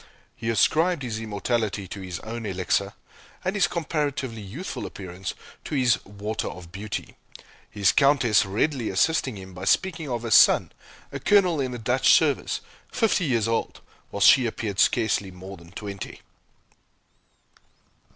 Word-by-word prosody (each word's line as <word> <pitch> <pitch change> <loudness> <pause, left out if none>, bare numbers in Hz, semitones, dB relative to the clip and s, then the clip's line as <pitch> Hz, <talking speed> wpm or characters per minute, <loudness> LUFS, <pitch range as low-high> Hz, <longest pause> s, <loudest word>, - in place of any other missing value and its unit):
He 115 - -4
ascribed 160 +7 +2
his 110 -3 -3
immortality 105 -2 -2
to 100 - -7
his 90 -3 -6
own 115 +1 -6
Elixir, 95 -2 -1 0.5
and 185 - 0
his 200 -4 +3
comparatively 145 -8 -2
youthful 115 - -6
appearance 95 -1 -7 0.3
to 155 - -4
his 125 -4 +2
"Water 105 +2 -4
of 85 -1 -9
Beauty," 100 +2 -6 0.5
his 100 -3 +2
Countess 135 -7 +4
readily 115 +5 -1
assisting 130 +4 +1
him 95 -1 -10
by 90 +2 -7
speaking 170 - +1
of 120 -2 -3
her 115 - -4
son, - - +6 0.4
a - - -5
Colonel 185 -7 +3
in 130 - -1
the 125 - -5
Dutch 125 +3 +2
service, - - +1 0.3
fifty 220 -6 +1
years 115 -6 +1
old, 115 0 -2 0.3
while 100 - -6
she 130 +4 +7
appeared 105 -3 -4
scarcely 110 -4 +2
more 95 +1 -10
than 85 -1 -16
twenty. 100 -1 -7
115 Hz, 145 wpm, -25 LUFS, 100-135 Hz, 0.5 s, she